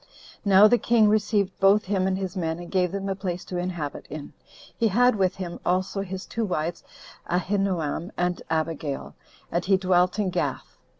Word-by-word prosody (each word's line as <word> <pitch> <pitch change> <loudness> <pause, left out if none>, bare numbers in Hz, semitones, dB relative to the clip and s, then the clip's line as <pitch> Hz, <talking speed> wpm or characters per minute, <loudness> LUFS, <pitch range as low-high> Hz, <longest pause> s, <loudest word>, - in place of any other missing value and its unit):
Now 200 +1 +7
the 240 +2 +4
king 225 -3 +4
received 210 -2 +1
both 200 +2 +4
him 190 -1 0
and 190 0 0
his 190 -1 -4
men, 165 -3 -2
and 175 0 -9
gave 180 -2 +1
them 195 0 -3
a 195 - 0
place 185 -2 -4
to 180 - -5
inhabit 175 -5 -4
in. 150 -1 -8 0.4
He 230 - +2
had 245 +4 +4
with 190 -3 +1
him 180 -3 -6
also 185 +2 0
his 190 -1 -6
two 230 - -3
wives, 170 -4 -2 0.5
Ahinoam 180 -2 -1
and 180 0 0
Abigail, 160 -3 -2 0.4
and 175 - 0
he 190 +1 +3
dwelt 185 0 +2
in 200 -3 0
Gath. - - -3
185 Hz, 180 wpm, -25 LUFS, 175-200 Hz, 0.5 s, Now